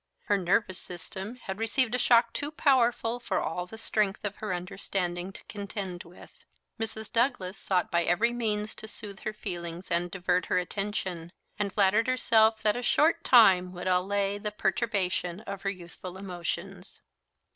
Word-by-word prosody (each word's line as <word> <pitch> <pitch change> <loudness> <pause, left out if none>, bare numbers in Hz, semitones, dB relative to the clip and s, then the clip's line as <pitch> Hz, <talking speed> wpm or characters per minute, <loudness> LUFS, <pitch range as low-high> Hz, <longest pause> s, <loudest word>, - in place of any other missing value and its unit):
Her 205 - +2
nervous 190 +1 +1
system 190 +5 -6
had 195 -5 -7
received 230 +2 +2
a 250 - +1
shock 235 -1 +4
too 290 - -2
powerful 245 -5 +2
for 245 - -2
all 180 +3 -3
the 220 - -10
strength 215 -2 0
of 205 0 -3
her 215 - -4
understanding 180 0 -2
to - - -11
contend 200 -3 -6
with. 170 +2 -16 0.4
Mrs. 220 -1 -4
Douglas 230 -6 +1
sought 185 -2 0
by 170 - +3
every 230 +7 +2
means 215 -3 -1
to 220 - -7
soothe 210 -2 -5
her 215 - -3
feelings 175 -2 -6
and 175 +1 +1
divert 180 -1 0
her - - +1
attention; 180 -2 -3 0.3
and 205 -1 0
flattered 210 +4 +3
herself 225 -3 +4
that 210 -1 +4
a 245 - -2
short 325 +6 +3
time 185 -7 +6
would 180 - -7
allay 195 +2 +1
the 210 0 -2
perturbation 190 -3 -1
of 200 -3 -6
her 195 - -1
youthful 180 0 -8
emotions. 180 -3 -5
200 Hz, 165 wpm, -28 LUFS, 180-225 Hz, 0.4 s, time